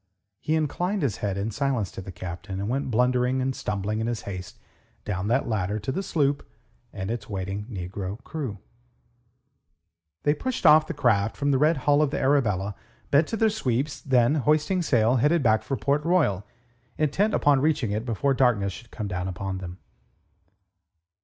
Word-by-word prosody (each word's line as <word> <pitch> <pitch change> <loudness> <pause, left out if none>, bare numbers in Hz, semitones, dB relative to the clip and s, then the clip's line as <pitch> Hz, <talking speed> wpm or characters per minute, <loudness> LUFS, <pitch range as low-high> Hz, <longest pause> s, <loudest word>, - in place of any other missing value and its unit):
He 155 - 0
inclined 175 +5 -1
his 120 -8 0
head 100 -2 -2
in 100 +3 -2
silence 135 -8 -1
to - - -7
the 95 - -8
Captain, 95 +2 -6
and 100 - -2
went 135 +3 -1
blundering 125 +2 +2
and 130 0 -1
stumbling 105 +1 -2
in 110 - -1
his 120 -2 -2
haste 90 -2 -7 0.5
down 95 -1 -2
that 125 +5 +1
ladder 105 -2 -1
to 110 +5 -3
the 190 - -2
sloop 145 -6 0 0.5
and 95 +3 -4
its 115 -1 -5
waiting 100 +1 -4
negro 95 -1 -5
crew. 135 -10 -5 1.7
They 145 - +3
pushed 250 - -4
off 155 0 +7
the 170 - -4
craft 110 -6 +2
from 145 0 +1
the 135 - +2
red 155 +2 +3
hull 145 0 +5
of 150 - +2
the - - -2
Arabella, 105 -8 +1 0.4
bent 145 +3 +4
to 225 - -3
their 220 0 +3
sweeps, 140 - -1
then, 125 0 +3
hoisting 155 +5 +2
sail, 120 -5 +3
headed 150 +5 +3
back 110 -2 +4
for 130 +5 -3
Port 145 +2 0
Royal, 145 - +1 0.5
intent 190 +8 +1
upon 145 -2 +4
reaching 140 -7 +1
it 105 +2 -1
before 125 +4 0
darkness 115 -7 +2
should 120 +2 -11
come 105 - -5
down 90 -1 -3
upon 95 0 -4
them. 90 -1 -7
125 Hz, 180 wpm, -26 LUFS, 100-145 Hz, 1.7 s, off